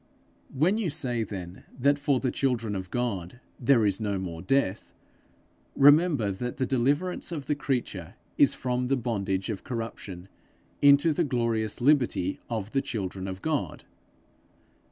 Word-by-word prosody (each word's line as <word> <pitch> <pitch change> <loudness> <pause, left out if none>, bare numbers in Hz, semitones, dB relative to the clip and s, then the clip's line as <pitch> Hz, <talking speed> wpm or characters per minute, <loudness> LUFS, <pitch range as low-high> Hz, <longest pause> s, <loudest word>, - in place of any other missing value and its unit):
When 170 +11 +2
you 200 -6 0
say 130 -6 -1
then 95 -4 -6
that 140 +3 +2
for 140 -2 +1
the 130 -1 -1
children 115 -6 -1
of 95 -1 -5
God 115 -3 -3 0.2
there 120 -3 +4
is 100 -2 +1
no 100 -3 -1
more 85 -3 -5
death, 110 -1 0 0.8
remember 145 - +5
that 125 +6 -5
the 130 - 0
deliverance 145 +10 0
of 150 -5 -4
the 150 - +1
creature 125 - -3 0.2
is - - +4
from 125 0 -1
the 135 +1 +2
bondage 100 -4 -2
of 100 - -6
corruption 115 -7 -6 0.5
into 145 +3 +6
the 170 - +1
glorious 115 -5 -1
liberty 145 +1 +2
of 110 -2 -3
the 135 - +1
children 95 -5 -4
of 95 0 -7
God. 155 -3 -2
120 Hz, 150 wpm, -27 LUFS, 100-140 Hz, 0.8 s, into